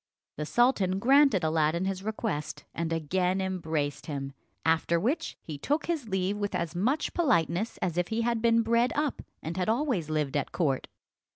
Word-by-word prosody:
The 150 0 -3
sultan 205 -6 +3
granted 265 - +5
Aladdin 160 +2 +1
his 190 -1 -2
request, 200 -8 -3
and 165 0 -2
again 180 +4 0
embraced 160 -6 -2
him. 140 -2 -4 0.3
After 165 +1 +2
which 280 - -1
he 150 -3 -7
took 295 - 0
his 310 -10 -2
leave 190 +1 0
with 205 -1 -2
as 170 -1 -2
much 255 - 0
politeness 215 - +1
as 175 -1 0
if 175 - 0
he 225 +1 -1
had 235 -1 0
been 230 0 +4
bred 235 +2 +2
up 295 -1 -1 0.2
and 165 +3 -4
had 185 +2 0
always 230 - 0
lived 150 -3 -1
at 145 - -1
court. 140 -7 0
185 Hz, 175 wpm, -29 LUFS, 160-230 Hz, 0.3 s, granted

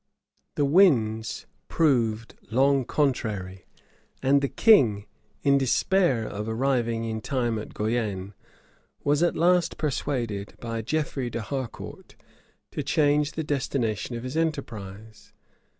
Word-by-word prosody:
The 145 - +2
winds 120 - +3 0.2
proved 115 -8 +1 0.2
long 135 +2 +3
contrary;[*] 105 -11 -1 0.6
and 140 +1 +4
the 140 - 0
king, 115 - +4 0.4
in 140 -1 +4
despair 135 - +2
of 105 +1 -5
arriving 115 -1 0
in 110 -1 -3
time 120 -3 -1
at 105 - -9
Guienne, 105 -3 -2 0.7
was 145 +1 +2
at 175 - +2
last 175 +1 +2
persuaded, 120 -8 -2
by 115 -1 -4
Geoffrey 135 0 -2
d'Harcourt, 120 +2 -6 0.6
to - - -3
change 150 0 +2
the 160 - -3
destination 125 -6 -2
of 115 - -6
his 130 +3 -5
enterprise. 110 -10 -4
125 Hz, 115 wpm, -26 LUFS, 110-145 Hz, 0.7 s, and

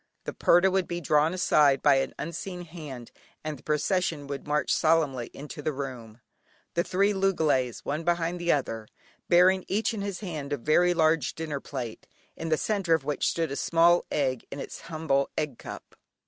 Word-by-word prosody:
The - - -5
purdah 175 +2 +4
would 190 -1 +1
be 175 0 -3
drawn 150 0 +3
aside 150 -6 +3
by 140 -2 +6
an 135 - -1
unseen 175 +2 -5
hand, 150 -8 -9 0.3
and 155 -3 -4
the - - -20
procession 155 0 0
would 140 0 -6
march 150 0 +1
solemnly 150 -7 +2
into 150 +1 -8
the 155 - -1
room, 125 -5 -7 0.5
the 170 - +1
three 200 +4 +2
loogalays, 160 - +1
one 150 +3 -2
behind 170 +1 0
the 175 - +2
other, 115 -6 -1 0.4
bearing 185 +2 +5
each 210 +3 0
in 215 - -4
his 200 -1 -4
hand 155 -7 -4
a - - 0
very 175 +7 +3
large 160 -3 +2
dinner 155 -3 -4
plate, 125 -5 -7 0.3
in 165 - -5
the 155 - +3
centre 195 -5 +1
of 160 - -3
which 145 0 -1
stood 165 -4 -1
a - - -2
small 170 +3 +4
egg 130 -4 0
in 140 - -7
its - - -7
humble 155 -4 0
egg 150 -6 -2
cup. - - -10
155 Hz, 185 wpm, -27 LUFS, 140-175 Hz, 0.5 s, by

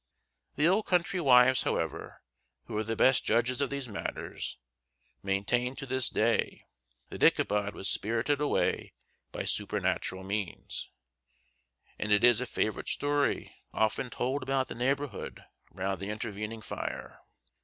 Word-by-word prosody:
The 150 +3 +3
old 200 +5 +2
country 180 0 +1
wives, 130 -2 +6
however, - - -3 0.4
who - - -6
are 110 - 0
the 115 +1 -2
best 130 +3 +4
judges 120 +4 +2
of 140 - +1
these 140 -2 -4
matters, 100 - -5 0.6
maintain 110 +6 0
to 135 - -6
this 130 -1 0
day 115 +1 0 0.4
that - - -8
Ichabod 105 0 +3
was 95 - -3
spirited 115 +7 +1
away 150 - 0 0.4
by - - -4
supernatural 95 0 -1
means; 100 -1 -4 1.1
and 105 - -2
it 105 +1 +4
is 120 -1 +6
a 125 - -3
favorite 110 - -1
story 145 0 0 0.2
often 110 +4 +1
told 130 +4 -1
about 130 0 0
the - - -4
neighborhood 135 0 -2 0.3
round 95 0 -3
the 100 +2 -5
intervening 105 +1 -4
fire. - - -5
120 Hz, 135 wpm, -30 LUFS, 105-135 Hz, 1.1 s, wives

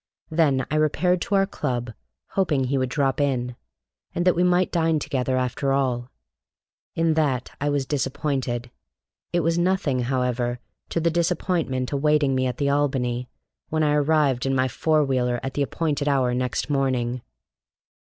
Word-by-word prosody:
Then 145 -5 +2
I 155 - +1
repaired 175 +4 +2
to 200 - 0
our 195 0 +4
club, 120 - -3 0.4
hoping 155 -9 +1
he 135 +2 0
would 130 -1 0
drop 135 +1 0
in, 125 -3 0 0.6
and 175 - 0
that 180 - +5
we 175 - +1
might 180 0 +3
dine 165 -2 +2
together 130 -3 -1
after 130 +2 0
all. 125 -3 0 0.9
In 165 -1 +2
that 140 -6 0
I 145 - +1
was 145 -2 0
disappointed. 130 -3 -2 0.6
It 175 - +1
was 165 +1 +1
nothing, 175 -7 +1
however, 125 -1 -1 0.3
to - - -1
the 165 0 +1
disappointment 165 -6 0
awaiting 145 -1 +2
me 130 0 +1
at 125 - -3
the 140 - 0
Albany, 130 -4 0 0.4
when 155 0 +1
I 150 -1 +3
arrived 145 -3 +2
in 135 - +1
my 130 0 +2
four 155 +5 +2
wheeler 125 -2 0
at 135 - -3
the 145 - -1
appointed 145 0 -1
hour 130 -3 +2
next 125 -1 -1
morning. 130 -4 0
140 Hz, 160 wpm, -24 LUFS, 125-155 Hz, 0.9 s, that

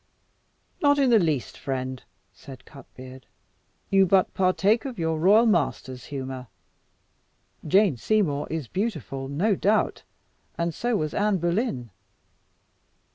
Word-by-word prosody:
"Not 285 -1 +4
in 270 -3 +3
the 225 - +6
least, 150 - -2
friend," 130 -1 -4 0.3
said 135 -2 -13
Cutbeard. 130 -2 -13 0.6
"You 195 -1 +5
but 190 +1 +2
partake 195 +4 +2
of 260 -4 -6
your 160 -2 -1
royal 205 +7 +5
master's 140 - -1
humour. 130 -2 -6 1.2
Jane 190 - +3
Seymour 155 - 0
is 160 -5 -4
beautiful, 155 - -4
no 170 +10 +1
doubt, 210 +3 +1 0.6
and 170 0 -1
so 240 +7 -1
was 155 -4 -3
Anne 205 -1 +1
Boleyn. 170 - -2
170 Hz, 120 wpm, -25 LUFS, 135-210 Hz, 1.2 s, the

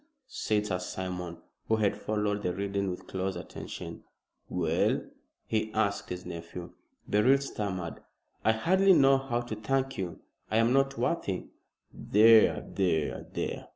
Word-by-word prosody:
said 105 - -1
Sir 90 -4 -1
Simon, 90 -1 -5 0.3
who 110 - +3
had 105 -2 +1
followed 105 -1 -1
the 90 - 0
reading 100 +1 -2
with 90 - -6
close 95 0 -3
attention. 85 - -7 0.5
"Well?" 85 -2 +1 0.4
he 110 -1 -1
asked 100 -2 0
his 90 0 -5
nephew. 85 +1 -7 0.4
Beryl 115 +7 +5
stammered. 100 -10 -4 0.4
"I 110 - +4
hardly 190 +11 +4
know 135 -4 +6
how 120 -3 -1
to 120 -2 -5
thank 135 +4 -1
you. 90 -2 -4 0.3
I 110 - +1
am 115 +2 +4
not 135 0 +2
worthy 100 - -1 0.3
" - - -42 0.2
"There 110 0 +7
there 85 -6 0
there!" - - -4
105 Hz, 145 wpm, -29 LUFS, 90-120 Hz, 0.5 s, There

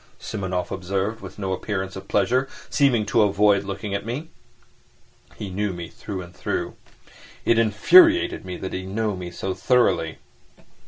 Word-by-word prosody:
Simonov 95 -4 -3
observed, 95 +3 -2
with 95 -1 -10
no 95 -2 -2
appearance 95 0 -3
of 95 0 -8
pleasure, 125 +8 +1 0.2
seeming 125 -7 +3
to 110 +2 +3
avoid 100 -1 +4
looking 100 +1 -4
at 100 - -2
me. 130 +9 -5 1.0
He 100 -3 -6
knew 100 +1 -1
me 85 -1 -7
through 95 -3 -6
and 85 0 -14
through. - - -3 0.7
It 115 - +4
infuriated 335 - +5
me 90 -1 -6
that 95 - -6
he 95 - -2
knew 105 +2 -2
me 90 -1 -6
so 95 +2 -4
thoroughly. 120 -9 +2
100 Hz, 155 wpm, -23 LUFS, 95-110 Hz, 1.0 s, infuriated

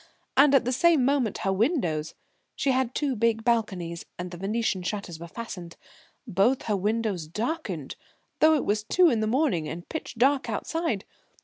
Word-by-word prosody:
And 280 +1 +6
at 255 - +4
the 250 - 0
same 310 0 +4
moment 270 -5 +1
her 195 - +2
windows 190 - 0 0.4
she 275 - +1
had 260 -1 0
two 280 -3 0
big 225 0 +1
balconies, 190 -8 -1
and 180 0 -5
the 175 - -7
venetian 200 +1 -1
shutters 180 -3 -4
were 170 - -8
fastened 180 -4 -8 0.5
both 225 +4 +2
her 210 - 0
windows 205 -4 -1
darkened 235 - -4 0.4
though 315 +1 +6
it 295 - -1
was 210 +1 0
two 345 +9 +4
in 230 - +1
the 215 - 0
morning 235 - +1
and 170 +2 -7
pitch 320 -5 -5
dark 265 +3 +2
outside. 325 - -2
225 Hz, 175 wpm, -26 LUFS, 190-265 Hz, 0.5 s, And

